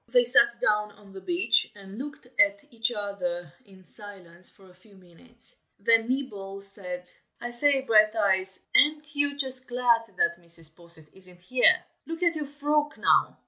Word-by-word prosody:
They - - +4
sat 420 -3 +5
down 210 0 0
on 205 -1 -18
the 190 - -10
beach 350 +1 +2
and 200 +1 -11
looked 290 0 -8
at 200 0 +3
each 230 +1 +1
other 180 -7 -5
in 190 -2 -19
silence 185 -4 -8
for 195 - -20
a 180 - -19
few 195 +3 -22
minutes. 190 +7 -8 0.2
Then 225 +2 +2
Nibble 200 -7 -4
said, 180 -3 -7 0.3
"I 240 - -6
say, 275 +3 +3
Brighteyes, 210 -5 +2 0.2
ain't 300 0 +4
you 285 0 +3
just 260 -2 0
glad 235 -3 +1
that 170 -1 0
Mrs. 165 -2 -1
Posset 170 -3 -15
isn't 180 -2 -19
here? 250 +7 +3 0.2
look 330 +2 -5
at 340 -1 +4
your 300 -2 0
frock, 295 +1 -1
now!" - - +3
210 Hz, 165 wpm, -26 LUFS, 185-265 Hz, 0.3 s, sat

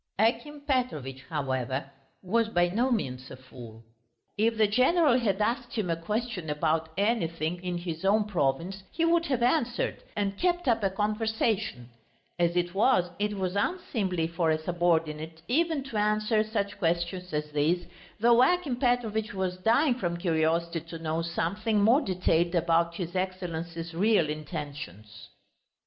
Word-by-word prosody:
Akim 235 +8 0
Petrovitch, 245 - -2
however, 130 0 -2 0.3
was 225 +5 +1
by 175 -4 +2
no 235 +8 +1
means 130 - -2
a - - -8
fool. 120 -3 -12 0.5
If 225 +2 +1
the 220 - +5
general 255 - +4
had 200 -5 0
asked 240 +3 -1
him 200 -7 -1
a - - +1
question 210 0 -3
about 160 +2 0
anything 175 -5 0
in 180 -1 -2
his 170 -1 -5
own 210 +3 +4
province 180 0 -1
he 330 - 0
would 335 0 +3
have 255 -4 0
answered 245 -2 +1
and 200 -1 -2
kept 350 -3 +1
up 230 -2 +3
a 195 - +2
conversation; 215 - -1 0.5
as 170 0 +2
it 175 0 0
was, 195 -4 +3
it 210 0 -1
was 185 0 -2
unseemly 200 - -1
for 165 0 0
a 155 - +3
subordinate 160 -1 -1
even 315 +2 +1
to 265 -5 -5
answer 215 +1 +2
such 205 -2 -3
questions 175 +1 -1
as 150 0 -3
these, 155 +4 +1 0.3
though 235 +2 +5
Akim 300 -3 +2
Petrovitch 225 -4 0
was 185 -1 -2
dying 240 +9 +3
from 175 -8 -2
curiosity 165 0 +1
to 165 +1 -9
know 160 0 -2
something 200 +6 -1
more 230 +8 +5
detailed 180 - +1
about 170 0 +2
his 175 0 -5
Excellency's 170 -3 -4
real 185 -2 +3
intentions. 140 - -7
185 Hz, 150 wpm, -28 LUFS, 165-225 Hz, 0.5 s, the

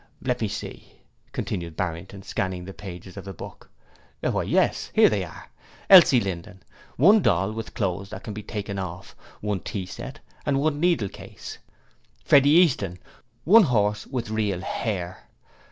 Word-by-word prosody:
'Let - - -1
me - - +1
see,' - - -7 0.4
continued 85 -3 -4
Barrington, 90 +3 -4
scanning 95 -2 -3
the 95 - -8
pages 95 -1 -10
of 100 - -6
the 95 - -7
book, - - -10 0.5
'Why, - - 0
yes, - - +1
here - - +7
they - - 0
are! - - -11 0.4
Elsie 170 -9 +9
Linden, 95 -2 -5 0.3
one 200 - +6
doll 95 - +2
with 110 0 -7
clothes 100 -3 -2
that 95 - -8
can 105 - -6
be 105 - -6
taken 100 -1 -5
off, 90 0 -7 0.3
one 105 -2 -1
tea 95 +1 -5
set, 135 +10 -8 0.2
one 145 +1 0
needlecase. 170 - -2 0.7
Freddie 140 0 +6
Easton, 140 - +4 0.5
one 210 - +7
horse 105 -5 +1
with 120 -4 -4
real 105 -4 -1
hair. 95 -4 -4
100 Hz, 150 wpm, -25 LUFS, 95-130 Hz, 0.7 s, Elsie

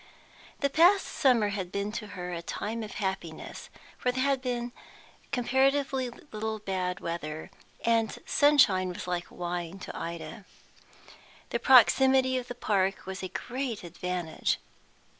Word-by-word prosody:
The 280 - +3
past 360 +6 +5
summer 240 -7 +3
had 190 -3 -4
been 200 +1 -2
to 215 -1 -5
her 180 0 -4
a 170 - -4
time 215 +6 -4
of 215 - -6
happiness, 190 -5 -4 0.3
for 250 - +1
there 260 +1 0
had 275 -1 +2
come 245 -1 -2 0.6
comparatively 265 +1 +2 0.2
little 220 0 -3
bad 190 -3 -2
weather, 160 0 -5 0.3
and 230 -1 +2
sunshine 265 -11 +5
was 180 - -6
like 180 -1 -2
wine 175 0 -4
to 190 - -8
Ida. 170 +4 -6 1.1
The - - 0
proximity 260 +1 +6
of 250 - -8
the 245 - -6
park 195 -4 0
was 190 0 -5
a 185 - -3
great 245 +1 -4
advantage. 175 -1 -2
210 Hz, 140 wpm, -29 LUFS, 180-255 Hz, 1.1 s, proximity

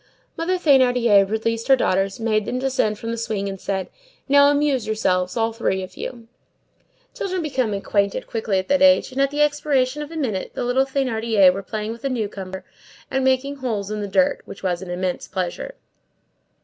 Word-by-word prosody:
Mother 340 +3 0
Thénardier 245 - +4
released 225 +1 -1
her 270 - +7
daughters, 195 -4 0
made 215 -2 0
them 250 - -2
descend 255 -5 0
from 230 +1 -5
the 230 - -3
swing, 210 -3 -2
and 195 -1 -6
said:— 190 -2 -2 0.4
"Now 285 0 +6
amuse 285 -5 +1
yourselves, 185 -3 0
all 225 0 +1
three 190 -4 -1
of 185 0 -10
you." 235 -2 -7 0.9
Children 370 -3 -3
become 260 -7 -1
acquainted 200 0 -1
quickly 220 -4 -1
at 185 - -2
that 280 0 +3
age, 280 -1 +5
and 265 +1 -1
at 275 - +3
the 295 +1 +2
expiration 290 -2 +1
of 295 - -6
a 330 - -9
minute 235 -12 -3
the - - -2
little 250 +2 +2
Thénardiers 225 -8 +3
were 195 - -4
playing 215 +2 -4
with 230 0 -9
the 275 - -2
newcomer 200 -6 -4 0.5
at 265 - +1
making 265 +2 +1
holes 215 -6 -3
in 210 0 -3
the 205 - -3
ground, 280 +7 +2
which - - -11
was 180 -2 -1
an 190 - -8
immense 180 0 -3
pleasure. 190 - -4
230 Hz, 190 wpm, -22 LUFS, 200-270 Hz, 0.9 s, her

